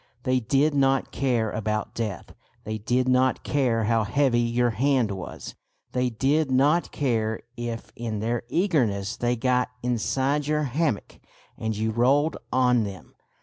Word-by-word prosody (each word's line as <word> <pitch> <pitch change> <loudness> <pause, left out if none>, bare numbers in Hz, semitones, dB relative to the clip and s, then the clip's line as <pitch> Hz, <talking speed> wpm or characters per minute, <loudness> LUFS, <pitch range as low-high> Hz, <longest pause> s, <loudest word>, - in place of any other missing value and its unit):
They 130 0 +2
did 140 +6 +2
not 135 -1 +2
care 120 -5 0
about 110 -1 -2
death, 105 -7 -4 0.3
they 110 0 -4
did 125 +4 0
not 130 0 +2
care 125 -6 +1
how 115 +1 +2
heavy 120 +3 +2
your 120 0 +1
hand 125 -2 +1
was, 95 -2 -7 0.4
they 125 0 0
did 135 +6 +1
not 145 +6 +2
care 110 -5 -1
if 120 -1 -6
in 115 -3 -4
their 115 +2 -1
eagerness 115 - +1
they 120 0 0
got 125 +1 +1
inside 130 +4 0
your 150 0 +1
hammock 140 -3 -2 0.4
and 110 -1 -3
you 110 +1 0
rolled 140 +7 +2 0.2
on 125 -2 +3
them. 95 -5 -8
125 Hz, 145 wpm, -25 LUFS, 110-135 Hz, 0.4 s, on